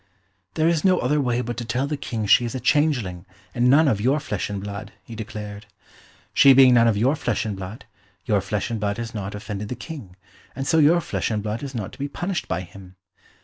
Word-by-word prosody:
"There 160 0 +2
is 165 -2 +1
no 185 -1 +4
other 145 +4 +1
way 125 -2 0
but 120 -1 -5
to 120 - -3
tell 120 +4 -1
the 150 +1 -2
King 115 -6 -4
she 115 - +5
is 120 +1 -4
a - - -2
changeling, 125 - +1 0.3
and 120 +1 +2
none 150 +4 +6
of 105 -7 +1
your 135 +6 +2
flesh 105 -10 -3
and 100 -1 -3
blood," 100 +1 -7
he 115 - -11
declared. 105 -1 -7 0.7
"She 135 - +7
being 130 -1 +7
none 115 -1 +5
of 110 -3 +2
your 130 +8 +2
flesh 120 -8 -2
and 105 -2 -3
blood, 95 +4 -8 0.4
your 105 -3 +2
flesh 105 +3 -3
and 115 - -2
blood 100 0 -1
has 115 -1 -5
not 105 -2 -5
offended 105 0 -6
the 125 - -3
King, 125 - -9 0.4
and 135 +1 -4
so 160 - +3
your 160 +3 +5
flesh - - -2
and 105 -3 -2
blood 105 +1 -3
is 135 -2 -6
not 105 -5 -4
to - - -14
be 140 - -2
punished 175 +5 -3
by 85 +1 -2
him. 95 +1 -13
115 Hz, 235 wpm, -23 LUFS, 105-140 Hz, 0.7 s, She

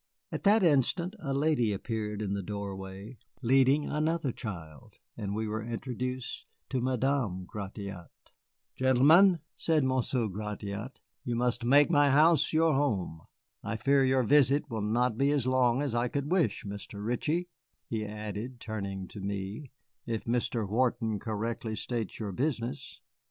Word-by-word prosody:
At - - -3
that 210 +1 +5
instant 170 - +2
a 140 -6 -4
lady 140 -5 +2
appeared 105 0 -3
in 100 -1 -2
the 100 - -2
doorway, 100 +2 -6 0.2
leading 135 +4 +4
another 155 -2 0
child, 85 - -8 0.2
and 100 -1 -4
we 110 0 -2
were 110 +1 -2
introduced 125 +2 -4 0.2
to 130 -2 -1
Madame 125 -7 0
Gratiot. 100 -3 -7 0.7
"Gentlemen," 155 +8 +5
said 160 -3 +2
Monsieur 130 -2 +1
Gratiot, 105 +3 -5 0.2
"you 120 - -2
must 120 0 0
make 140 +4 +5
my 145 -1 +5
house 155 +4 +5
your 160 0 +3
home. 105 - 0 0.4
I 110 - -3
fear 135 +4 +3
your 130 0 +3
visit 140 +2 +3
will 110 -2 -2
not 115 +2 +1
be 140 +1 +3
as 145 -4 +1
long 130 0 +3
as 140 - -2
I 120 +1 +1
could 140 +4 -3
wish, 160 - +1
Mr. 100 0 -7
Ritchie," 155 +9 -1 0.4
he 110 -2 -2
added, 105 +3 -6
turning 100 -4 -5
to 105 - -9
me, 100 +6 -5 0.4
"if 115 -2 -2
Mr. 115 -2 -1
Wharton 115 -1 0
correctly 110 +1 -3
states 115 -2 -4
your 105 -3 -4
business. 120 - -3
120 Hz, 145 wpm, -30 LUFS, 105-140 Hz, 0.7 s, that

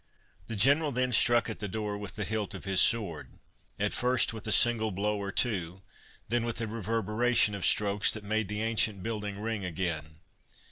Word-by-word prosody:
The 115 - -5
General 145 +8 +3
then 125 0 0
struck 120 0 +4
at - - -6
the 105 - -4
door 105 +1 -3
with 100 -2 -7
the 105 - -3
hilt 110 -2 -3
of - - -9
his 95 -1 +3
sword—at 105 0 -2
first 125 -3 +2
with 110 -1 -8
a - - -1
single 115 -1 +3
blow 105 +2 -2
or 100 0 -4
two, 95 -6 -1 0.4
then 120 +2 0
with 120 0 -3
a 115 - -2
reverberation 115 +1 +1
of 100 -3 -5
strokes 105 -1 +3
that 110 - -6
made 110 0 -1
the 105 +2 -3
ancient 110 -3 0
building 105 -3 -4
ring 110 -1 -3
again. 80 -4 -4
105 Hz, 185 wpm, -29 LUFS, 100-115 Hz, 0.4 s, struck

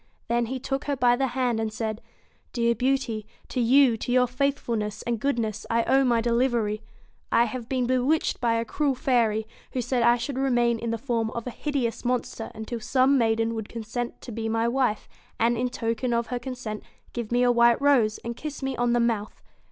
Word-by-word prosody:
Then 235 0 +1
he 260 +3 -3
took 270 +2 -3
her 285 - 0
by 245 -2 +4
the 270 +2 0
hand, 245 -2 0
and 220 -1 -1
said: 215 0 -3 0.5
'Dear 235 -1 +2
Beauty, 245 -4 -1 0.2
to - - -2
you, 250 0 +5
to 245 - -4
your 250 0 +5
faithfulness 240 -5 -2
and 235 -2 -1
goodness, 225 -5 -1
I 230 0 +2
owe 270 +3 +3
my 240 -3 +3
delivery. 235 -3 +1 0.5
I 235 - +5
have 235 0 -5
been 255 -2 0
be 255 +1 +2
witched 295 +4 +1
by 235 -2 +2
a 230 0 0
cruel 280 +3 0
fairy, 230 -4 +1 0.3
who 255 - -1
said 245 +1 0
I 235 +1 +5
should 260 +2 -4
remain 240 -3 +2
in 235 - -3
the 230 - -1
form 230 -2 -1
of 235 0 -5
a 250 - -4
hideous 245 -5 -2
monster 245 -2 -2
until 220 +2 -5
some 260 +3 +3
maiden 225 0 +1
would 220 -2 -5
consent 235 +1 -5
to 245 - -8
be 225 0 -3
my 225 +1 +1
wife, 245 -3 0 0.3
and 235 +1 +3
in 250 +2 0
token 230 +1 -2
of 235 -1 0
her 245 - -1
consent 240 -4 -6 0.3
give 235 -2 -4
me 245 +1 +3
a 245 - +5
white 235 0 +5
rose, 255 -7 +3
and 235 0 -3
kiss 290 0 -6
me 270 -1 -1
on 240 0 +2
the 240 - +3
mouth. 225 -3 -1
240 Hz, 210 wpm, -26 LUFS, 225-255 Hz, 0.5 s, you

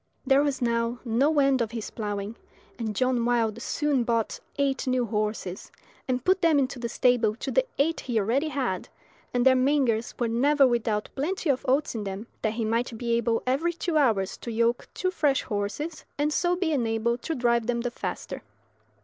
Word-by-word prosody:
There 275 0 +5
was 280 -3 0
now 235 0 0
no 270 +7 +2
end 275 -2 +4
of 230 - 0
his 225 -2 -6
ploughing, 205 0 -4 0.4
and 220 -2 -3
John 255 0 +1
Wilde 235 -2 +1
soon 285 -1 0
bought 230 -2 -1 0.2
eight 275 -2 0
new 255 -1 +2
horses, 210 -3 -3 0.4
and 250 -1 -1
put 375 0 +3
them 330 -3 +4
into 270 -2 0
the 235 -1 -3
stable 240 -3 +2
to 265 +3 -4
the - - +2
eight 320 +4 +1
he 240 -3 -1
already 245 +9 +1
had, 260 -11 -2 0.4
and 245 0 +1
their 265 - +7
mangers 255 -4 +1
were 240 - 0
never 275 +5 +4
without 225 -4 0
plenty 320 +3 0
of 260 - -2
oats 280 +4 +2
in 220 -3 -3
them, 195 +2 -5 0.2
that 220 -1 0
he 225 -1 -2
might 230 +1 -1
be 235 0 -1
able 230 0 +1
every 290 +7 +1
two 340 0 -3
hours 225 -10 +2
to 235 - -6
yoke 235 +1 +1
two 370 - 0
fresh 290 -6 +1
horses, 210 +11 -3
and 295 +1 +1
so 350 +2 +2
be 355 -3 0
enabled 235 -3 0
to 325 - -3
drive 235 -2 +1
them 235 -1 0
the 245 0 -2
faster. - - -5
245 Hz, 190 wpm, -26 LUFS, 225-280 Hz, 0.4 s, their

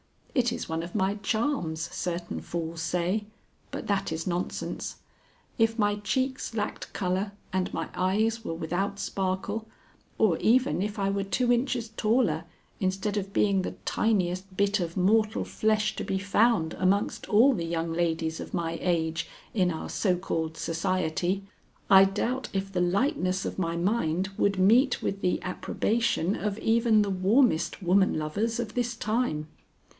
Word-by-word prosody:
It 245 -3 +2
is 240 - -4
one 160 0 -2
of 170 +1 -8
my 190 +2 +1
charms, 215 - -1
certain 175 -1 -3
fools 165 -1 -4
say, 180 +5 0 0.4
but - - -5
that 200 -4 0
is 160 0 -3
nonsense. 180 0 -3 0.6
If 225 0 +3
my 205 -1 +2
cheeks 260 +4 -2
lacked 210 -1 -3
color 190 +2 -1 0.2
and 185 -1 0
my - - -3
eyes 215 +5 +1
were 165 - -3
without 175 +5 -2
sparkle, 200 +3 -2 0.5
or 195 -7 +3
even 250 -3 +3
if 210 +2 -2
I 195 -1 +1
were 200 0 -1
two 240 +5 +1
inches 240 -2 0
taller 225 +5 +1 0.3
instead 195 +1 -1
of 200 -1 -3
being 195 -2 +3
the - - -4
tiniest 185 -3 0
bit 200 +1 +2
of 170 -1 -3
mortal 215 +4 +3
flesh 215 0 +1
to - - -2
be 190 - -1
found 200 -3 +2
amongst 195 +2 0
all 240 +7 +6
the 170 -7 -2
young 165 0 -2
ladies 165 -1 -1
of - - -7
my 165 -1 -2
age 165 -2 0 0.3
in 185 -5 +2
our 160 -2 -4
so 185 -4 +1
called 160 -3 -3
society, 180 +2 -1 0.5
I 195 0 +9
doubt 240 +7 -1
if 195 0 -2
the 180 -2 0
lightness 185 -1 +1
of - - -4
my 170 -2 -1
mind 185 -1 0
would 200 -1 +2
meet 235 +8 +4
with 195 0 -2
the 180 - +1
approbation 205 0 0
of 210 -1 -2
even 225 -1 +3
the 200 - -2
warmest 190 - +2
woman 190 +1 +3
lovers 205 +10 -1
of 220 -3 -3
this 240 -1 -1
time. 215 -9 -1
195 Hz, 160 wpm, -28 LUFS, 175-220 Hz, 0.6 s, I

